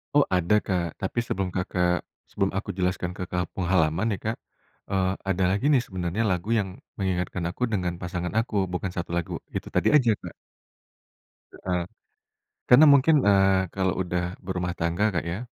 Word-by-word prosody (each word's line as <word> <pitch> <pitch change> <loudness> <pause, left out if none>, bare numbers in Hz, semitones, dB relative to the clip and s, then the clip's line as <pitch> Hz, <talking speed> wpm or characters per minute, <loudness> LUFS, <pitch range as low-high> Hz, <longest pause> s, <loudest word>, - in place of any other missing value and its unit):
Oh 145 - +7
ada 90 +2 +3
Kak, 85 -4 -2
tapi 95 +5 -1
sebelum 95 -5 -2
Kakak 90 -1 0 0.3
sebelum 95 -1 0
aku 100 +2 -3
jelaskan 90 -1 -1
tentang 90 -1 -3
pengalaman 90 +1 +1
ya - - -9
Kak. 110 +1 -2 0.5
Eee, 95 -1 +1 0.2
ada 95 0 +1
lagi 100 +7 -1
nih 130 -4 +4
sebenarnya 90 +3 -2
lagu 90 +3 -2
yang 95 -2 -4 0.2
mengingatkan 90 -2 -1
aku 110 - -5
dengan 90 -6 -1
pasangan 90 -1 -3
aku, 115 -1 -3 0.2
bukan 90 +1 -2
1 85 -1 -4
lagu, 85 - -3 0.2
itu - - -3
tadi - - +3
aja 120 -6 +5
Kak. - - -8 1.2
Heeh. 90 -2 -2 0.9
Karena 145 +5 +9
mungkin, 140 -1 +5
eee, 95 -1 +4
kalau 95 -1 +1
udah 90 0 -3
berumah 90 -1 -3
tangga 85 +6 +1
Kak 85 -5 -2
ya, 85 +3 -3
95 Hz, 160 wpm, -26 LUFS, 90-100 Hz, 1.2 s, Karena